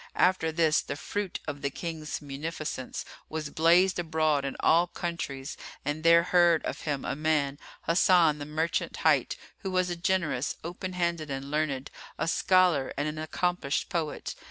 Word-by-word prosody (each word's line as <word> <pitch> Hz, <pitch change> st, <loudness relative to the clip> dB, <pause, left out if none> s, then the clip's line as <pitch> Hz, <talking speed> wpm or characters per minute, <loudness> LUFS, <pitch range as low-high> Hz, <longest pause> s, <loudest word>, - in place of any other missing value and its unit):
After 180 Hz, -3 st, +3 dB
this, 160 Hz, -1 st, +3 dB
the 140 Hz, -, -5 dB, 0.2 s
bruit 205 Hz, -3 st, -2 dB
of 145 Hz, -2 st, -4 dB
the 140 Hz, -, 0 dB
King's 155 Hz, 0 st, -5 dB
munificence 145 Hz, -1 st, -5 dB, 0.2 s
was 155 Hz, -2 st, -4 dB
blazed 175 Hz, +4 st, +4 dB
abroad 155 Hz, -4 st, +1 dB
in 135 Hz, -, -3 dB
all 170 Hz, +2 st, +4 dB
countries 155 Hz, -6 st, -5 dB, 0.3 s
and 145 Hz, +2 st, -2 dB
there 170 Hz, 0 st, +7 dB
heard 175 Hz, -2 st, +4 dB
of -, -, -4 dB
him 145 Hz, -3 st, -2 dB
a -, -, -2 dB
man, 150 Hz, -2 st, 0 dB, 0.3 s
Hasan 165 Hz, -3 st, +4 dB
the 145 Hz, -, -5 dB
Merchant 160 Hz, +2 st, -1 dB
hight, -, -, +3 dB, 0.2 s
who 195 Hz, -, -4 dB
was 185 Hz, -1 st, +1 dB
a -, -, -1 dB
generous, 170 Hz, -6 st, 0 dB
open 180 Hz, +2 st, -5 dB
handed 170 Hz, -3 st, -1 dB
and 135 Hz, +1 st, -5 dB
learned, 145 Hz, -3 st, -1 dB, 0.3 s
a -, -, -1 dB
scholar 180 Hz, -6 st, +3 dB
and 145 Hz, +2 st, 0 dB
an 155 Hz, 0 st, -4 dB
accomplished 160 Hz, -2 st, -1 dB
poet. 160 Hz, -4 st, -3 dB
160 Hz, 160 wpm, -28 LUFS, 145-175 Hz, 0.3 s, there